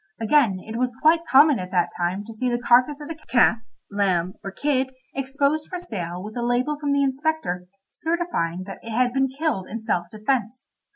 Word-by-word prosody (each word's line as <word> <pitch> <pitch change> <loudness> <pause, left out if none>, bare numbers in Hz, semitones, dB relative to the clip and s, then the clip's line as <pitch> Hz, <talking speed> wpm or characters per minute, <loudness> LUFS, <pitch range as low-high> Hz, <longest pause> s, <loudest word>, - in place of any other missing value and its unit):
Again, 225 -4 +3
it 220 +1 -5
was 250 -1 -1
quite 325 +2 +3
common 285 0 +6
at 180 0 -5
that 180 -2 +1
time 180 +4 -2
to 225 - -9
see 250 +3 -1
the 240 - +1
carcase 250 +4 +3
of 295 - -6
a - - -2
calf, 235 -1 +4 0.3
lamb, 185 -3 +1
or 195 - -4
kid 260 +3 -1 0.2
exposed 280 +3 -1
for 365 - -4
sale 180 - -5
with 215 +1 -8
a 240 - -2
label 245 +5 +1
from 290 -1 -1
the 280 0 +3
inspector 270 - -1 0.3
certifying 320 - -1
that 195 +1 -9
it 230 - -9
had 250 -1 +2
been 270 0 +2
killed 270 - -2
in 230 - -5
self 175 -5 -1
defence. 230 +2 -2
245 Hz, 195 wpm, -24 LUFS, 200-280 Hz, 0.3 s, common